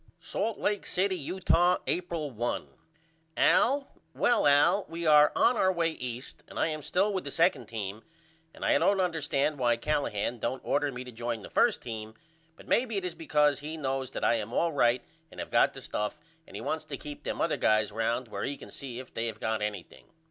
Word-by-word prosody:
Salt 205 +5 -3
Lake 205 -1 -1
City, 190 +1 +1
Utah, 180 +2 +2
April 170 -5 -2
1. 120 +1 -2 0.7
AL: 275 +2 +3 0.2
Well 240 - +3
Al 155 +8 +5
we 170 +1 -5
are 150 -1 +7
on 250 - +4
our 190 -4 +3
way 170 -2 +1
East 125 -3 -7
and - - -11
I - - +2
am 155 -1 -4
still 195 +7 +1
with 190 - -2
the - - -5
2d 175 +2 +2
team 105 -1 -5 0.5
and - - -7
I - - +4
don't 200 -1 +3
understand 150 -5 0
why 120 -2 +3
Callahan 120 -4 -1
don't 130 +4 -3
order 145 0 +1
me 125 -1 -6
to 125 - -10
join 120 -2 -4
the - - -9
1st 240 -3 +3
team 110 -2 -6 0.4
but - - -16
maybe 235 -4 +1
it 190 - -2
is 180 - -3
because 150 -3 +2
he 155 +2 -6
knows 135 -3 -2
that - - -6
I - - +4
am 110 0 -5
all 165 +6 +1
right 120 -3 +3 0.3
and - - -12
have - - -6
got - - +4
the - - -8
stuff 105 0 -3 0.3
and - - -12
he - - -5
wants 160 - -2
to 140 - -5
keep 145 +1 -8
them - - -4
other - - +1
guys 110 0 +2
round 115 +3 -1
where 100 -2 -5
he 140 0 -3
can - - -12
see 130 -4 -7
if 130 - -9
they 115 +1 -2
have 115 - -6
got 110 -1 -1
anything. 105 -4 -5
145 Hz, 215 wpm, -29 LUFS, 120-170 Hz, 0.7 s, are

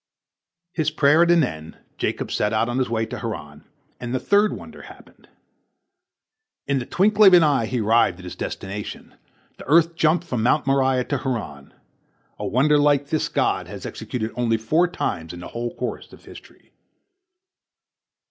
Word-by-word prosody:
His 155 -3 0
prayer 155 +1 +3
at 170 - +4
an 170 -2 +5
end, 80 - -6 0.2
Jacob - - -2
set 105 +1 0
out 110 +1 +1
on 120 +2 -2
his 130 - 0
way 115 -1 -1
to - - -7
Haran, 75 -11 -7 0.3
and 120 +1 -4
the - - 0
third 205 +6 +3
wonder - - -9
happened. - - -16 1.4
In 140 -1 0
the 120 - -6
twinkling 210 +2 +4
of 190 - +7
an 175 - +6
eye 140 -7 +2
he 125 -1 -2
arrived 110 -4 +3
at 90 - -13
his 90 - -8
destination. 100 +2 -6 0.5
The - - -10
earth 165 +3 +4
jumped 165 +1 +2
from 125 -9 -3
Mount 125 +6 +2
Moriah 135 -1 +2
to 140 +1 -3
Haran. 115 - -5 0.6
A - - -3
wonder 145 +5 +3
like 145 -1 +2
this 155 - 0
God - - 0
has - - -9
executed 110 -3 -5
only 115 -2 0
four 155 +11 +2
times 85 - -4
in 85 - -9
the 90 - -9
whole 120 0 -5
course - - -5
of - - -16
history. - - -15
130 Hz, 175 wpm, -22 LUFS, 110-155 Hz, 1.4 s, of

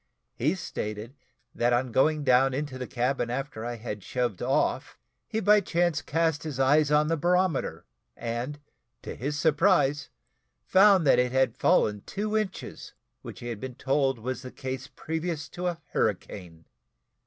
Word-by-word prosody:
He 150 +9 0
stated, 105 - -5 0.4
that 120 +1 +1
on 125 +1 0
going 150 +5 +2
down 130 0 +4
into 140 -2 -4
the 125 - -4
cabin 125 0 -1
after 130 -2 -4
I 120 0 -3
had 110 -3 -6
shoved 120 -7 -2
off, - - 0 0.3
he, 220 - -2
by 210 -1 +5
chance, 175 -4 0
cast 160 0 0
his 145 -4 -5
eyes 145 +3 +4
on 150 0 +3
the 165 - +1
barometer, 180 0 0 0.3
and, 120 +5 -4 0.4
to - - -6
his 145 +4 -3
surprise, 150 -2 +2 0.5
found 190 -2 +5
that 135 - +5
it 125 0 +1
had 130 -3 +2
fallen 105 -1 +2
two 210 +2 -3
inches, 215 -3 -4 0.3
which - - -10
he 120 - -5
had 115 -3 -5
been 130 +2 -7
told 135 -1 +1
was 125 +3 -4
the 130 - -8
case 130 -1 -5
previous 160 -1 -4
to 180 +1 -4
a 175 -2 -2
hurricane. 90 -5 -3
135 Hz, 160 wpm, -27 LUFS, 120-160 Hz, 0.5 s, by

